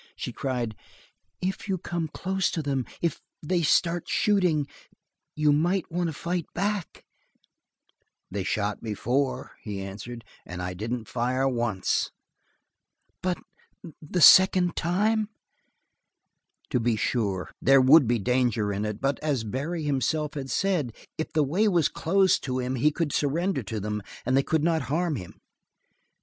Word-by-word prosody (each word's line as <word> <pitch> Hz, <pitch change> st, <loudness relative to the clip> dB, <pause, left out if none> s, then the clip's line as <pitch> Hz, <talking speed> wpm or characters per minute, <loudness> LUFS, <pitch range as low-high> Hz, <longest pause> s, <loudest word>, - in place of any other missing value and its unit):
She -, -, -5 dB
cried: 120 Hz, -5 st, -2 dB, 0.7 s
"If 190 Hz, +2 st, -2 dB
you 190 Hz, -, +1 dB
come 170 Hz, -1 st, -3 dB
close 190 Hz, +4 st, -1 dB
to 160 Hz, -, -3 dB
them 135 Hz, -3 st, -1 dB, 0.2 s
if, 170 Hz, -, 0 dB, 0.2 s
they 175 Hz, +3 st, +1 dB
start 170 Hz, +2 st, +2 dB
shooting 180 Hz, -8 st, +2 dB, 0.7 s
you 150 Hz, -1 st, +3 dB
might 175 Hz, +5 st, +1 dB
want 175 Hz, +1 st, 0 dB
to -, -, -5 dB
fight 170 Hz, +3 st, -3 dB
back 200 Hz, -1 st, -2 dB, 0.7 s
" -, -, -47 dB
"They 100 Hz, 0 st, -2 dB
shot 105 Hz, +3 st, -1 dB
before," 120 Hz, +6 st, -1 dB
he 100 Hz, -2 st, -5 dB
answered, 105 Hz, +4 st, -7 dB, 0.2 s
"and 90 Hz, 0 st, -8 dB
I 90 Hz, 0 st, -3 dB
didn't 110 Hz, +4 st, -4 dB
fire 125 Hz, +2 st, 0 dB
once." 120 Hz, -6 st, 0 dB, 1.1 s
"But 180 Hz, -1 st, 0 dB, 0.6 s
the 165 Hz, +3 st, -2 dB
second 185 Hz, +2 st, +7 dB
time?" 210 Hz, +5 st, +1 dB, 1.4 s
To -, -, +2 dB
be 115 Hz, -1 st, +1 dB
sure, 100 Hz, -6 st, -1 dB
there 135 Hz, +1 st, +6 dB
would 135 Hz, +1 st, +7 dB
be 120 Hz, +1 st, +2 dB
danger 120 Hz, -2 st, +1 dB
in 100 Hz, +2 st, -2 dB
it, 105 Hz, 0 st, -4 dB
but 135 Hz, +1 st, 0 dB
as 145 Hz, -6 st, -1 dB
Barry 145 Hz, +9 st, -3 dB
himself 150 Hz, +2 st, 0 dB
had 135 Hz, -2 st, -5 dB
said, 170 Hz, -, 0 dB, 0.2 s
if 160 Hz, -, -3 dB
the 155 Hz, -2 st, +2 dB
way 180 Hz, +11 st, +2 dB
was 175 Hz, -7 st, +3 dB
closed 185 Hz, +3 st, +2 dB
to 130 Hz, -1 st, -2 dB
him 125 Hz, 0 st, -2 dB
he 130 Hz, +4 st, +3 dB
could 155 Hz, -1 st, -2 dB
surrender 160 Hz, +3 st, 0 dB
to 110 Hz, 0 st, -4 dB
them, 105 Hz, +1 st, -3 dB, 0.2 s
and 130 Hz, +2 st, +2 dB
they 135 Hz, -, +5 dB
could 155 Hz, +2 st, 0 dB
not 165 Hz, -1 st, +2 dB
harm 165 Hz, +1 st, 0 dB
him. 90 Hz, -5 st, -10 dB
140 Hz, 150 wpm, -26 LUFS, 120-170 Hz, 1.4 s, second